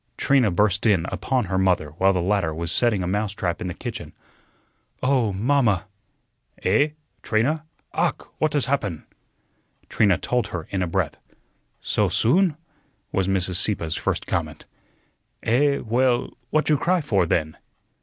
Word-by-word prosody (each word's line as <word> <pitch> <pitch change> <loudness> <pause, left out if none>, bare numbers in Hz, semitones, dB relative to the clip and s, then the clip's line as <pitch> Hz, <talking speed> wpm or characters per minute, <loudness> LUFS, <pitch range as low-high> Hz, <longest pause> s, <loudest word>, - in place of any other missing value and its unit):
Trina 135 -5 +3
burst 100 +3 +2
in 95 -6 +3
upon 130 -4 0
her 95 0 -1
mother 90 -5 +2
while 95 +5 +3
the 90 -3 0
latter 95 -5 0
was 85 +1 -2
setting 110 -4 +2
a - - -2
mousetrap 100 -2 -2
in - - -3
the 90 - -5
kitchen. - - -7 0.9
"Oh, 130 -5 +2
mamma!" 105 -2 +2 0.8
"Eh? 150 +1 +2 0.3
Trina? 145 +9 0 0.3
Ach, - - 0 0.2
what 155 -1 +1
has 145 -3 +1
happun?" 100 - -1 0.9
Trina 100 -5 +3
told 125 +3 -1
her 85 -3 -5
in 95 - -1
a 90 - 0
breath. 80 - -1 0.6
"Soh - - +1
soon?" 165 - +2 0.5
was 95 -1 0
Mrs. 95 -2 0
Sieppe's 90 -5 -1
first - - -2
comment. - - -3 0.8
"Eh, 140 +5 +3
well, 120 +2 0
what 155 0 +1
you 150 -3 +3
cry 180 +1 +2
for, 100 - +1
then?" 80 -1 0
105 Hz, 145 wpm, -23 LUFS, 90-130 Hz, 0.9 s, Trina